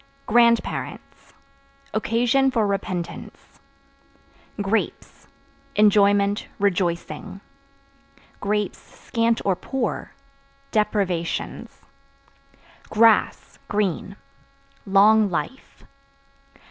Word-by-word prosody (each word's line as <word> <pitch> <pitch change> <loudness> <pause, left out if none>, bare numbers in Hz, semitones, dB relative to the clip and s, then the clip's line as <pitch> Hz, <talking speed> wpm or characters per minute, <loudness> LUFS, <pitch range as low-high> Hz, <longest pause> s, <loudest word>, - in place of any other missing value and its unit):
Grandparents 235 +1 0 0.6
Occasion 240 +5 +2
for 230 -4 +1
repentance. 185 -3 -5 1.0
Grapes 205 +3 -3 0.5
Enjoyment, 205 -1 +3
rejoicing; 190 -1 -2 1.3
(scant 230 -1 -2
or 195 -2 +2
poor) 250 +4 -4 0.6
deprivations. 200 -6 -2 1.1
Grass 225 0 +2
(Green) 205 -5 -2 0.7
long 205 +2 +5
life. 180 - -5
210 Hz, 55 wpm, -23 LUFS, 195-230 Hz, 1.3 s, long